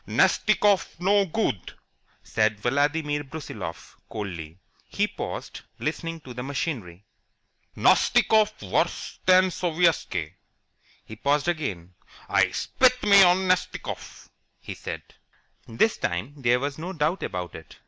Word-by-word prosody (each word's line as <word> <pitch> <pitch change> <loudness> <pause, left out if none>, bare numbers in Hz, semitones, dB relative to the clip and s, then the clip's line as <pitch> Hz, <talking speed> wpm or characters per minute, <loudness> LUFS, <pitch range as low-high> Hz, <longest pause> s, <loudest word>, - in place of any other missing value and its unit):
"Nastikoff 200 -5 +2
no 200 +2 +3
good," 165 - -2 0.5
said 110 -1 0
Vladimir 145 +5 0
Brusiloff, 135 - -8
coldly. 85 -7 -6 0.3
He - - 0
paused, - - -6 0.2
listening 165 +1 -4
to 130 -4 -10
the 125 - -6
machinery. 120 - -4 0.7
"Nastikoff 215 -1 +4
worse - - -1
than 185 0 +6
Sovietski." 165 - 0 0.7
He 110 - -9
paused 140 +7 +1
again. 100 - -3 0.3
"I - - +3
spit 255 -1 +2
me 200 -1 +7
of 180 -1 +6
Nastikoff!" 185 -1 -2 0.3
he - - -7
said. - - -7 0.6
This 120 - +1
time 90 +11 -3
there 125 -3 +2
was 140 +2 -4
no 180 +4 -5
doubt 160 +3 0
about 90 -2 -4
it. - - -11
145 Hz, 115 wpm, -25 LUFS, 110-180 Hz, 0.7 s, me